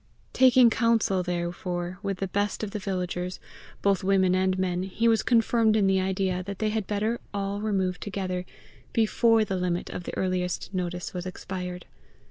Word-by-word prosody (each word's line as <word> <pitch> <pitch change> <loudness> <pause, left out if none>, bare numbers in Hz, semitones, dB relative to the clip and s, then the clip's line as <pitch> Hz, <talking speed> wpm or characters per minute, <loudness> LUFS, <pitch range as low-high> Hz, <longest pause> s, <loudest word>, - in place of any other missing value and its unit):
Taking 255 -2 +6
counsel 225 -5 +2
therefore 175 +1 -3
with 200 -2 -2
the 195 - -2
best 205 +3 -1
of 205 - -3
the 210 - -3
villagers, 180 -2 -3 0.4
both 200 -1 +2
women 190 -1 +3
and 185 0 +2
men, 180 -1 0
he 195 +5 0
was 225 -1 +4
confirmed 230 -2 +3
in 210 -2 +3
the 190 -1 +3
idea 190 -1 0
that 200 +1 -6
they 215 +2 0
had 215 -2 -2
better 215 +3 -1 0.2
all 200 0 -2
remove 190 -4 0
together, 185 -3 -3 0.5
before 225 0 +3
the 190 -2 -2
limit 180 -1 -2
of 175 - -6
the - - -5
earliest 185 0 -2
notice 180 -1 -3
was 180 0 -4
expired. 180 -1 -6
190 Hz, 170 wpm, -27 LUFS, 180-210 Hz, 0.5 s, Taking